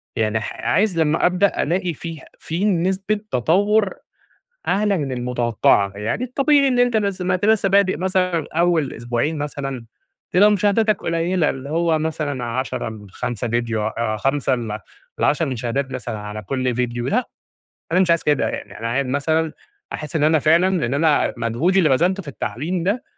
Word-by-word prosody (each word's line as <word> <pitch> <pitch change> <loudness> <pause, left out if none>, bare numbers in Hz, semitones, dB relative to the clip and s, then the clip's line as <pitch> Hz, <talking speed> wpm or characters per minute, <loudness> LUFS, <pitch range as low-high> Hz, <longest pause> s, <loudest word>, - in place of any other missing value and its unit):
يعني 110 0 +1
ح 105 - -5
عايز 175 - +2
لمّا 155 0 +2
أبدأ، 180 +2 +2
ألاقي 175 +2 -1
فيه 165 0 -7 0.2
في 170 +5 -2
نسبة 190 +2 0
تطوّر 200 - +2 0.8
أعلى 200 -1 +2
من 140 -4 -3
المتوقّعة. 120 -5 +1
يعني 110 - -2
الطبيعي 275 +2 +3
إن 250 - +1
أنت 245 -2 +3
لسّه 200 -3 -1
ما 185 - +1
أنت 185 - -1
لسّه 215 -2 +3
بادئ 195 -1 +3
مثلًا 185 -3 0
أوّل 165 -3 +1
أسبوعين 120 +7 -2
مثلًا، 135 -4 -4 0.5
تبقى 205 +4 +6
مشاهداتك 210 +1 +2
قليّلة 170 0 +1
اللي 135 +1 -7
هو 165 0 +1
مثلًا 155 -5 -2
10 130 +2 -3
من 105 -3 -10
5 120 +4 -4
فيديو 115 -2 -1
أ 110 -1 -2
5 135 +3 +1
ل 110 -4 -4 0.4
ل10 155 +2 +2
مشاهدات 130 +1 -2
مثلًا 110 - -5
على 105 +1 -6
كل 130 +3 -1
فيديو 120 0 -2
لأ، 245 +3 0 0.6
أنا 180 - +4
مش 185 -2 +3
عايز 170 -1 +3
كده. 150 -2 +1
يعني - - -7
أنا 115 - -3
عاي 135 +4 0
مثلًا 155 +4 0 0.4
أحِسْ 150 +2 -4
إن 150 - +2
أنا 160 +1 +4
فعلًا 170 +6 +3
لإن 135 -6 -1
أنا 150 0 +2
مجهودي 120 +12 +1
اللي 170 -5 +4
بَذلته 175 +8 +2
في 160 - -12
التعليم 160 +6 -3
ده، 205 +8 -1
155 Hz, 170 wpm, -21 LUFS, 125-185 Hz, 0.8 s, تبقى